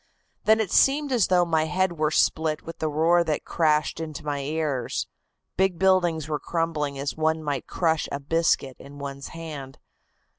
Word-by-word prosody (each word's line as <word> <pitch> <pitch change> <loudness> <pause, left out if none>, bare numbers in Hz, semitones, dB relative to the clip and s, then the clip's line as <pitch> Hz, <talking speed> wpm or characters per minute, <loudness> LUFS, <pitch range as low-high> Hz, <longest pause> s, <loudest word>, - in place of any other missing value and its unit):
Then 220 +1 +5
it 210 -4 -1
seemed 285 +1 +3
as 235 -7 +3
though 180 -1 +3
my 160 -2 +1
head 180 +1 0
were 155 -1 +2
split 155 0 +1
with 165 - -9
the 155 - -1
roar 165 +3 +3
that 155 -3 -2
crashed 155 -2 +1
into 155 -1 -6
my 145 -1 -2
ears. 145 -3 -2 0.5
Big 190 -1 +2
buildings 175 -4 +2
were 150 -2 -2
crumbling 155 -4 -2
as 140 +1 -3
one 160 0 0
might 145 -3 -3
crush 160 -3 0
a 140 - -2
biscuit 145 -3 0
in 140 +1 -12
one's 140 -1 -6
hand. 150 -5 -8
160 Hz, 175 wpm, -25 LUFS, 145-170 Hz, 0.5 s, Then